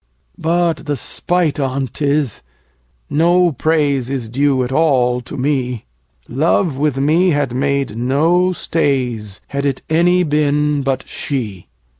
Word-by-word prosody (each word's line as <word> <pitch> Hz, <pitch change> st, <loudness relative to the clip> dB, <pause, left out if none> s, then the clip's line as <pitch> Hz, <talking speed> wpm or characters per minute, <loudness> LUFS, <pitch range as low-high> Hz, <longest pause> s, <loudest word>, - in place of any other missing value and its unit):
But 170 Hz, -1 st, 0 dB
the 145 Hz, -, 0 dB
spite 170 Hz, +4 st, -1 dB
on 135 Hz, 0 st, -1 dB
't 135 Hz, -, -7 dB
is, 145 Hz, -4 st, 0 dB, 0.7 s
no 175 Hz, +3 st, +3 dB
praise 145 Hz, -3 st, 0 dB
Is 130 Hz, -5 st, -3 dB
due 135 Hz, +1 st, +1 dB
at 125 Hz, -, -4 dB
all 130 Hz, -5 st, +2 dB
to 125 Hz, -, -8 dB
me: 125 Hz, -4 st, -1 dB, 0.4 s
10 125 Hz, -, -10 dB
Love 160 Hz, 0 st, +2 dB
with 145 Hz, 0 st, 0 dB
me 160 Hz, +7 st, +3 dB
had 145 Hz, -6 st, 0 dB
made 140 Hz, -3 st, -1 dB
no 160 Hz, +10 st, +2 dB
stays, 125 Hz, -, -1 dB
Had 140 Hz, 0 st, -1 dB
it 135 Hz, -2 st, -3 dB
any 175 Hz, +3 st, +3 dB
been 150 Hz, -1 st, +1 dB
but 135 Hz, -1 st, -2 dB
she. 110 Hz, -10 st, -4 dB
140 Hz, 140 wpm, -17 LUFS, 130-160 Hz, 0.7 s, no